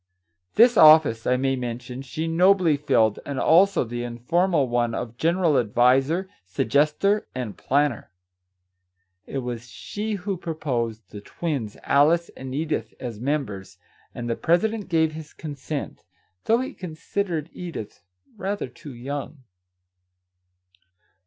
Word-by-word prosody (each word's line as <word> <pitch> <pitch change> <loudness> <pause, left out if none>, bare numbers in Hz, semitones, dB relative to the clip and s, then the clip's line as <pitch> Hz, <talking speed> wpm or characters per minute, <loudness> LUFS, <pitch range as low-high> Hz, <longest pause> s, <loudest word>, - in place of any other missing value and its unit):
This 240 0 +6
office, 155 -8 +7
I 125 - +3
may 135 +1 +1
mention, 125 +1 -5
she 155 +5 -4
nobly 180 -1 +4
filled, 130 -7 +2
and 140 -2 -4
also 195 +5 +4
the 120 0 -5
informal 145 +6 +1
one 120 -1 0
of 115 -1 -5
general 165 0 +2
adviser, 130 - +2 0.2
sug 95 +4 -3
gester, 155 - +2
and 120 -6 -4
planner. 140 -4 0 1.2
It 135 -2 -4
was 120 -1 -5
she 210 - -5
who 195 -1 -3
proposed 120 - -3
the 105 - -8
twins, 135 -5 -4
Alice 160 +5 +3
and 130 0 -8
Edith, 155 +1 -2
as 120 -4 -6
members, 110 -9 -3 0.4
and 120 - -5
the 115 - 0
president 205 - 0
gave 160 -2 +2
his 155 -1 -10
consent, 145 -1 -6 0.4
though 230 +2 +3
he 260 - -5
considered 170 -1 -4
Edith 165 - -7 0.3
rather 200 -6 -3
too 130 +2 -11
young 140 +3 -6
145 Hz, 125 wpm, -24 LUFS, 120-170 Hz, 1.2 s, office